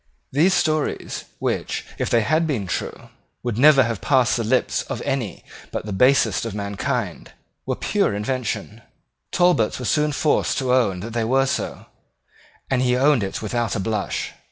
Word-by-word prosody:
These 165 Hz, +7 st, +3 dB
stories, 155 Hz, -2 st, -1 dB
which, -, -, -2 dB
if -, -, -1 dB
they 115 Hz, -, +3 dB
had 155 Hz, +9 st, +1 dB
been 125 Hz, -10 st, -1 dB
true, 90 Hz, -, -5 dB, 0.3 s
would 120 Hz, -2 st, -2 dB
never 140 Hz, -1 st, +7 dB
have 115 Hz, -3 st, -3 dB
passed 130 Hz, -4 st, +3 dB
the 115 Hz, -, -1 dB
lips 125 Hz, +4 st, +1 dB
of -, -, -3 dB
any 125 Hz, -7 st, -3 dB, 0.3 s
but -, -, -4 dB
the 105 Hz, -, -4 dB
basest 120 Hz, -1 st, +3 dB
of 115 Hz, -3 st, -4 dB
mankind, 100 Hz, -1 st, -3 dB, 0.3 s
were -, -, 0 dB
pure 100 Hz, -, 0 dB
inventions. 110 Hz, -1 st, -3 dB, 0.5 s
Talbot 175 Hz, -11 st, +2 dB
was 125 Hz, -, -1 dB
soon 150 Hz, 0 st, +2 dB
forced 145 Hz, +2 st, +1 dB
to 130 Hz, -2 st, +1 dB
own 105 Hz, -8 st, +2 dB
that 110 Hz, +3 st, -6 dB
they 115 Hz, -1 st, 0 dB
were 135 Hz, +4 st, +2 dB
so; -, -, -3 dB, 0.8 s
and 130 Hz, -2 st, +1 dB
he 125 Hz, -1 st, +2 dB
owned 140 Hz, -1 st, +4 dB
it 100 Hz, +2 st, -4 dB
without 115 Hz, 0 st, -1 dB
a -, -, -1 dB
blush. 105 Hz, 0 st, -2 dB
120 Hz, 170 wpm, -22 LUFS, 105-135 Hz, 0.8 s, never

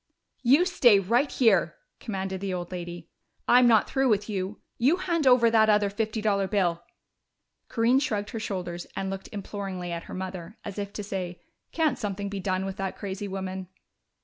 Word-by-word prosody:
"You 275 Hz, +8 st, +5 dB
stay 245 Hz, -, +5 dB
right 235 Hz, +9 st, +1 dB
here!" 195 Hz, -9 st, +3 dB, 0.2 s
commanded 190 Hz, -3 st, -4 dB
the 195 Hz, -2 st, -2 dB
old 175 Hz, 0 st, -5 dB
lady. 175 Hz, -2 st, -7 dB, 0.4 s
"I'm 245 Hz, 0 st, +6 dB
not 225 Hz, -3 st, +5 dB
through 270 Hz, -1 st, +1 dB
with 210 Hz, -1 st, +1 dB
you. 195 Hz, -1 st, -3 dB, 0.2 s
You 275 Hz, +9 st, +4 dB
hand 335 Hz, -5 st, 0 dB
over 245 Hz, -2 st, +6 dB
that 220 Hz, -1 st, +5 dB
other 210 Hz, -1 st, +3 dB
fifty 220 Hz, +1 st, -2 dB
dollar 200 Hz, -2 st, +2 dB
bill!" 180 Hz, -5 st, +1 dB, 0.9 s
Corinne 240 Hz, +3 st, +3 dB
shrugged 210 Hz, -7 st, -2 dB
her 225 Hz, -, -4 dB
shoulders 180 Hz, -5 st, -4 dB
and 195 Hz, 0 st, -2 dB
looked 195 Hz, 0 st, -6 dB
imploringly 195 Hz, -3 st, -5 dB
at 170 Hz, 0 st, -5 dB
her -, -, -8 dB
mother, 185 Hz, +1 st, -6 dB
as 205 Hz, 0 st, -5 dB
if 200 Hz, 0 st, -4 dB
to 210 Hz, -, -5 dB
say, 185 Hz, -3 st, -4 dB, 0.3 s
"Can't 320 Hz, -2 st, +1 dB
something 200 Hz, -2 st, -3 dB
be 200 Hz, -1 st, -4 dB
done 185 Hz, 0 st, -1 dB
with 195 Hz, 0 st, -5 dB
that 195 Hz, -1 st, -3 dB
crazy 200 Hz, 0 st, -5 dB
woman?" 190 Hz, -1 st, -5 dB
200 Hz, 180 wpm, -27 LUFS, 190-225 Hz, 0.9 s, I'm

